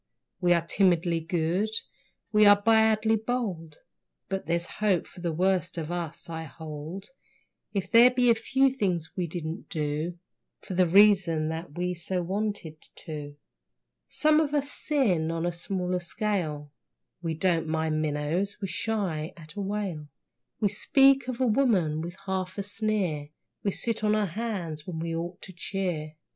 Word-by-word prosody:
We 180 -1 +2
are 170 -1 +1
timidly 175 -2 +2
good, 175 +4 0 0.6
we 210 -1 +6
are 205 0 +8
badly 220 0 +4
bold, 210 -9 -3 0.5
But 195 -5 -3
there's 170 +1 +1 0.2
hope 195 -5 +2
for 180 - -13
the 170 -1 -1
worst 180 +1 +1
of 165 0 -3
us, 170 0 -4
I 160 -1 -5
hold, 160 +5 -8 0.6
If 195 -2 -3
there 235 +2 +8
be 250 -1 +3
a - - +7
few 265 +4 +2
things 180 -10 -1
we 180 -2 -1
didn't 165 +2 -5
do, 155 +2 -2 0.4
For - - -7
the 180 0 +3
reason 180 -4 +5
that 160 -1 -6
we 180 0 0
so 180 +1 -3
wanted 195 -4 -3 0.2
to. 145 -2 -7 0.7
Some 310 0 +4
of 300 -2 0
us 285 0 0
sin 200 - +1
on 165 0 -2
a 175 - +1
smaller 180 +1 -2
scale. 170 -6 -2 0.5
(We 165 -2 -2
don't 165 -1 +1
mind 160 -1 0
minnows, 155 +6 -1
we 195 -3 -3
shy 175 -4 -2
at 155 -2 -12
a 205 - -4
whale.) 195 -6 -3 0.5
We 205 - +2
speak 270 +5 +4
of 255 -1 -4
a 260 - +3
woman 210 - +2
with 170 +2 -6
half 185 -1 -2
a 200 - -1
sneer, 200 -8 -1 0.3
We 200 - 0
sit 225 +2 -2
on 210 0 +3
our 215 -1 +2
hands 180 -6 -4
when 175 -3 -4
we 165 0 -3
ought 175 +2 -5
to 185 - -9
cheer. 170 -4 -3
180 Hz, 160 wpm, -28 LUFS, 160-210 Hz, 0.7 s, are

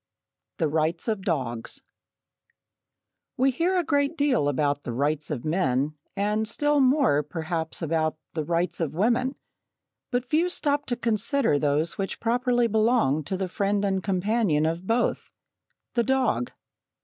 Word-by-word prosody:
The 160 - +1
Rights 160 +4 0
of 215 -3 -1
Dogs 130 - -2 1.5
We 265 +2 +3
hear 345 +8 +1
a 355 - +2
great 285 +1 0
deal 260 - +2
about 145 0 0
the 120 - -5
"rights 145 +4 -1
of 145 -5 -4
men" 150 -3 +1 0.2
and 210 +2 0
still 295 +6 +1
more, 260 - +4
perhaps, 160 +2 -4
about 155 -1 0 0.2
the 155 - -2
"rights 170 +3 -1
of 155 -3 -2
women," 240 - +1 0.7
but 245 0 -1
few 320 +7 +1
stop 290 -4 0
to 245 - 0
consider 230 - +1
those 150 +5 0
which 195 - -3
properly 245 +1 +1
belong 220 - +2
to 190 - -2
the 190 0 -2
friend 200 +2 0
and 190 -1 0
companion 190 -4 +1
of 165 +3 -2
both 235 +2 0 0.6
the 240 - +2
dog. 255 - +1
195 Hz, 145 wpm, -26 LUFS, 155-245 Hz, 1.5 s, more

